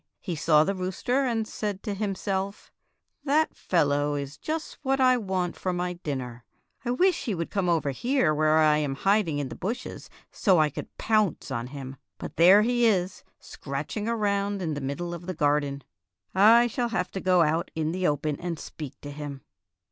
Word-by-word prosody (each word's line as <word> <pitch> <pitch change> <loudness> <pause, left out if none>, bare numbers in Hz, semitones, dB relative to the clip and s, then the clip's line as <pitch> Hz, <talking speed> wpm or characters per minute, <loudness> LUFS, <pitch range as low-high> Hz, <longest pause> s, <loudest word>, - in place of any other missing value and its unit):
He 180 -4 -4
saw 155 0 +4
the 195 - 0
rooster 195 +9 -1
and 225 -2 -1
said 205 -3 -4
to 210 - -2
himself, 195 -1 -3 0.5
"That 305 +2 +2
fellow 145 -3 +1
is 140 0 -5
just 315 0 -4
what 270 -1 0
I 255 -1 +5
want 190 -6 -2
for 185 - -2
my 180 0 -2
dinner. 130 -8 -5 0.4
I 240 - -3
wish 360 +9 +2
he 220 -6 -1
would 170 -1 -4
come 190 -3 0
over 155 -4 +1
here 240 - +1
where 155 +1 +3
I 155 -1 +5
am 145 -3 -1
hiding 195 -1 +2
in 140 -2 -2
the 115 - -7
bushes 210 - -5 0.2
so 190 -4 +3
I 155 -2 +3
could - - -8
pounce 215 -9 +1
on 120 -1 -3
him. 135 0 -8 0.2
But - - -8
there 185 +5 +7
he 240 0 +3
is 185 -3 0
scratching 150 +10 -5
around 205 -3 0
in 165 -4 -2
the 145 - -4
middle 170 +6 -3
of 175 +1 -8
the 185 - -3
gar 145 0 +3
den. 140 -1 -6 0.5
I 225 +5 +7
shall 240 0 -1
have 180 -5 -2
to 190 - -4
go 180 -2 +4
out 160 +2 0
in 160 0 -1
the 185 +1 0
open 150 0 -1
and 175 -2 -4
speak 150 -2 -8
to 145 - -7
him." 145 -2 -7
180 Hz, 195 wpm, -27 LUFS, 150-210 Hz, 0.5 s, there